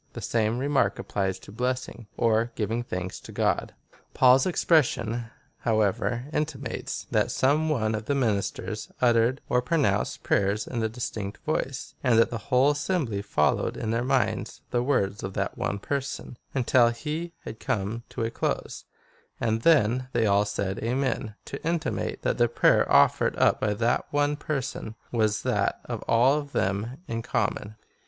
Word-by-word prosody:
The -, -, -6 dB
same 115 Hz, 0 st, 0 dB
remark 140 Hz, +2 st, +1 dB
applies 95 Hz, -2 st, -2 dB
to -, -, -13 dB
bles 125 Hz, +3 st, -1 dB
sing, 120 Hz, -3 st, -11 dB
or 115 Hz, +1 st, +2 dB
giving 115 Hz, +2 st, -1 dB
thanks 90 Hz, -6 st, -5 dB
to -, -, -11 dB
God.'' -, -, 0 dB, 0.4 s
Paul's 130 Hz, +2 st, +6 dB
expression, 120 Hz, -10 st, +2 dB, 0.3 s
however, 115 Hz, +2 st, 0 dB
intimates,^ 140 Hz, -5 st, -3 dB
that -, -, +2 dB
some 150 Hz, +4 st, +2 dB
one 110 Hz, -7 st, +1 dB
of 110 Hz, 0 st, -3 dB
the 140 Hz, -, 0 dB
ministers 110 Hz, -7 st, -1 dB
uttered 120 Hz, +2 st, +3 dB
or 125 Hz, -, +2 dB
pronounced 130 Hz, -6 st, 0 dB
prayers 100 Hz, +2 st, +1 dB
in 120 Hz, -3 st, -3 dB
a 110 Hz, -, 0 dB
distinct 110 Hz, -3 st, -5 dB
voice, 135 Hz, -4 st, -2 dB
and 125 Hz, -4 st, +4 dB
that 115 Hz, -, +4 dB
the 115 Hz, -, -3 dB
whole 130 Hz, +2 st, +5 dB
assembly 145 Hz, -, -1 dB
followed 75 Hz, -8 st, +1 dB
in 110 Hz, -, -2 dB
their 115 Hz, +1 st, 0 dB
minds 130 Hz, 0 st, 0 dB
the 120 Hz, -, +2 dB
words 115 Hz, -6 st, 0 dB
of 95 Hz, -, -5 dB
that -, -, -2 dB
one 100 Hz, -, -2 dB
person, 140 Hz, +3 st, -4 dB, 0.2 s
until 125 Hz, -2 st, +4 dB
he 155 Hz, +8 st, -4 dB
had 110 Hz, -, -8 dB
come 115 Hz, -2 st, -2 dB
to -, -, -4 dB
a 115 Hz, -, -1 dB
close, -, -, -3 dB, 0.5 s
and 110 Hz, -1 st, 0 dB
then 130 Hz, -4 st, +3 dB
they 115 Hz, -2 st, +2 dB
all 100 Hz, 0 st, +3 dB
said 100 Hz, -1 st, -2 dB
Amen 120 Hz, -2 st, -1 dB
— -, -, -44 dB
to 140 Hz, -, -7 dB
intimate, 165 Hz, 0 st, -2 dB
that -, -, 0 dB
the 120 Hz, -, +5 dB
prayer -, -, +3 dB
offered -, -, +4 dB
up -, -, +3 dB
by 105 Hz, -1 st, +1 dB
that 115 Hz, +3 st, +1 dB
one 145 Hz, 0 st, +1 dB
person 135 Hz, -7 st, -4 dB, 0.2 s
was 110 Hz, -3 st, +1 dB
that -, -, 0 dB
of -, -, -4 dB
all 130 Hz, +6 st, +4 dB
of 145 Hz, -1 st, -9 dB
them 100 Hz, +7 st, -1 dB
in 115 Hz, 0 st, -3 dB
common. 110 Hz, -1 st, -2 dB
120 Hz, 165 wpm, -26 LUFS, 110-135 Hz, 0.5 s, Paul's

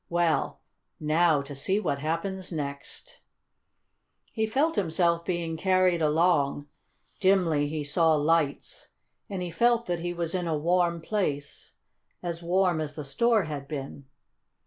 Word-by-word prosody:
Well, 170 Hz, -2 st, 0 dB, 0.4 s
now 155 Hz, -1 st, +2 dB
to 140 Hz, +1 st, -9 dB
see 170 Hz, +9 st, 0 dB
what 140 Hz, -9 st, -1 dB
happens 175 Hz, +5 st, -3 dB
next!" 150 Hz, -, -6 dB, 1.1 s
He 220 Hz, -1 st, 0 dB
felt 285 Hz, +9 st, +1 dB
himself 170 Hz, -3 st, +1 dB
being 170 Hz, -2 st, -2 dB
carried 185 Hz, -1 st, +2 dB
along. 150 Hz, -2 st, +2 dB, 0.5 s
Dimly 175 Hz, -7 st, +3 dB
he 150 Hz, 0 st, -3 dB
saw 160 Hz, +2 st, +3 dB
lights, 150 Hz, -1 st, 0 dB, 0.4 s
and 190 Hz, -2 st, -3 dB
he 175 Hz, -, -5 dB
felt 235 Hz, +6 st, +2 dB
that 175 Hz, -1 st, -2 dB
he 175 Hz, +1 st, -3 dB
was 170 Hz, -1 st, -3 dB
in 180 Hz, -2 st, -1 dB
a 160 Hz, -2 st, 0 dB
warm 170 Hz, +1 st, +1 dB
place 150 Hz, -7 st, -3 dB, 0.5 s
as 170 Hz, -1 st, -4 dB
warm 175 Hz, -1 st, +1 dB
as 150 Hz, -1 st, -5 dB
the 150 Hz, -, -6 dB
store 220 Hz, +10 st, +2 dB
had 145 Hz, -3 st, -6 dB
been. 140 Hz, -1 st, -6 dB
170 Hz, 140 wpm, -27 LUFS, 150-185 Hz, 1.1 s, Dimly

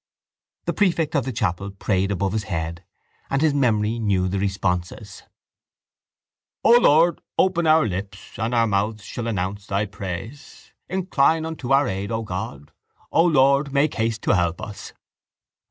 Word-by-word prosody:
The -, -, -1 dB
prefect 170 Hz, -6 st, +1 dB
of 140 Hz, -4 st, +1 dB
the 130 Hz, -, -2 dB
chapel 100 Hz, -4 st, -2 dB
prayed 95 Hz, -1 st, -1 dB
above 100 Hz, 0 st, -1 dB
his 110 Hz, -2 st, -2 dB
head 85 Hz, -2 st, -4 dB, 0.5 s
and 135 Hz, -, +1 dB
his 155 Hz, -1 st, +3 dB
memory 115 Hz, -4 st, +1 dB
knew 95 Hz, -4 st, +1 dB
the 95 Hz, +1 st, -2 dB
responses: 95 Hz, 0 st, -3 dB, 1.4 s
O -, -, +5 dB
Lord, 165 Hz, -3 st, +4 dB, 0.2 s
open 175 Hz, -3 st, +2 dB
our 155 Hz, 0 st, +5 dB
lips 95 Hz, 0 st, -6 dB
And 115 Hz, +3 st, -1 dB
our 115 Hz, -1 st, +4 dB
mouths 105 Hz, +1 st, -1 dB
shall 115 Hz, +2 st, -5 dB
announce 100 Hz, -1 st, -3 dB
Thy 100 Hz, +1 st, 0 dB
praise. 100 Hz, -, -8 dB, 0.2 s
Incline 165 Hz, -4 st, +1 dB
unto 155 Hz, -5 st, -5 dB
our 135 Hz, 0 st, +4 dB
aid, 95 Hz, +2 st, -3 dB
O 115 Hz, 0 st, -2 dB
God! 90 Hz, -8 st, -6 dB, 0.4 s
O 165 Hz, -, +4 dB
Lord, 140 Hz, -3 st, +3 dB
make 140 Hz, +2 st, +2 dB
haste 110 Hz, 0 st, -2 dB
to -, -, +2 dB
help 85 Hz, -2 st, 0 dB
us! 110 Hz, -1 st, -8 dB
110 Hz, 155 wpm, -23 LUFS, 95-140 Hz, 1.4 s, O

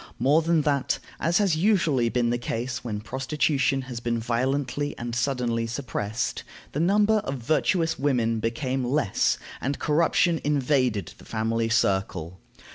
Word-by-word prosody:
More 150 Hz, +5 st, +4 dB
than 165 Hz, -1 st, +2 dB
that, 140 Hz, -2 st, +1 dB, 0.2 s
as 165 Hz, +3 st, +2 dB
has 195 Hz, -6 st, +2 dB
usually 160 Hz, -, +2 dB
been 120 Hz, -1 st, +1 dB
the 120 Hz, -, 0 dB
case 120 Hz, +1 st, -3 dB
when 105 Hz, -4 st, -4 dB
prostitution 135 Hz, +3 st, 0 dB
has 125 Hz, -2 st, -6 dB
been 120 Hz, 0 st, -1 dB
violently 130 Hz, +5 st, -1 dB
and 120 Hz, 0 st, -5 dB
suddenly 120 Hz, -2 st, 0 dB
suppressed, 115 Hz, -3 st, -3 dB, 0.3 s
the 145 Hz, -, -3 dB
number 205 Hz, +5 st, +3 dB
of 140 Hz, -10 st, -2 dB
virtuous 160 Hz, +6 st, +1 dB
women 120 Hz, -5 st, +1 dB
became 125 Hz, +4 st, -1 dB
less, 125 Hz, -4 st, +1 dB, 0.2 s
and 140 Hz, +2 st, -1 dB
corruption 165 Hz, +2 st, +2 dB
invaded 130 Hz, -, +1 dB
the -, -, -15 dB
family 115 Hz, +1 st, -1 dB
circle. 95 Hz, -6 st, 0 dB
130 Hz, 140 wpm, -25 LUFS, 115-150 Hz, 0.3 s, More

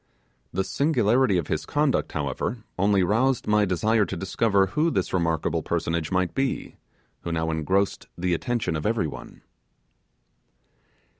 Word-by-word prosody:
The 95 Hz, -, 0 dB
singularity 120 Hz, -, +2 dB
of 85 Hz, -, -1 dB
his -, -, -2 dB
conduct, 145 Hz, -1 st, 0 dB
however, 75 Hz, -, -3 dB
only 100 Hz, 0 st, +3 dB
roused 120 Hz, +7 st, +1 dB
my 105 Hz, 0 st, +3 dB
desire 105 Hz, +4 st, +2 dB
to 95 Hz, -, -5 dB
discover 100 Hz, +2 st, +2 dB
who 150 Hz, -, +1 dB
this 95 Hz, -, -1 dB
remarkable 85 Hz, -3 st, 0 dB
personage 80 Hz, -1 st, -2 dB
might 90 Hz, -1 st, 0 dB
be, 135 Hz, -1 st, -2 dB, 0.4 s
who 85 Hz, -, -5 dB
now 80 Hz, -1 st, -1 dB
engrossed 95 Hz, +6 st, 0 dB
the 90 Hz, 0 st, 0 dB
attention 100 Hz, -1 st, -1 dB
of 75 Hz, -, -2 dB
every 110 Hz, -5 st, +1 dB
one. 75 Hz, -, -9 dB
95 Hz, 140 wpm, -25 LUFS, 85-115 Hz, 0.4 s, only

